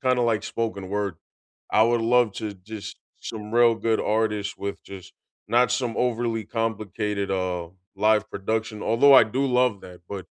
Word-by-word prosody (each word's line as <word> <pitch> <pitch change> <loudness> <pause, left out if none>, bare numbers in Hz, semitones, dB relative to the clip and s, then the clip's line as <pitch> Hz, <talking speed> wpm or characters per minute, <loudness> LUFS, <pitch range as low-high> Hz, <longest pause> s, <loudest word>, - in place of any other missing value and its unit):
kinda 130 -1 +2
like 110 -3 +1
spoken 110 -6 -4
word. 100 -2 -2 0.6
I 110 - +4
would 120 +1 +3
love 120 -1 +3
to 105 -2 -5
just 100 +2 -9 0.2
Some 105 -1 -7
real 120 -1 +5
good 110 0 0
artists 105 -2 -1
with 100 0 -5
just 95 -2 -11 0.4
not 125 +1 +3
some 125 -2 -1
overly 115 -2 -1
complicated, 105 -2 -2
uh, 90 -3 -2 0.3
live 105 +1 +2
production, 110 +1 -3
although 140 +5 +5
I 130 - +9
do 130 +6 -1
love 125 -5 +2
that, 90 -1 -12
but 95 -3 -6
110 Hz, 160 wpm, -24 LUFS, 100-115 Hz, 0.6 s, I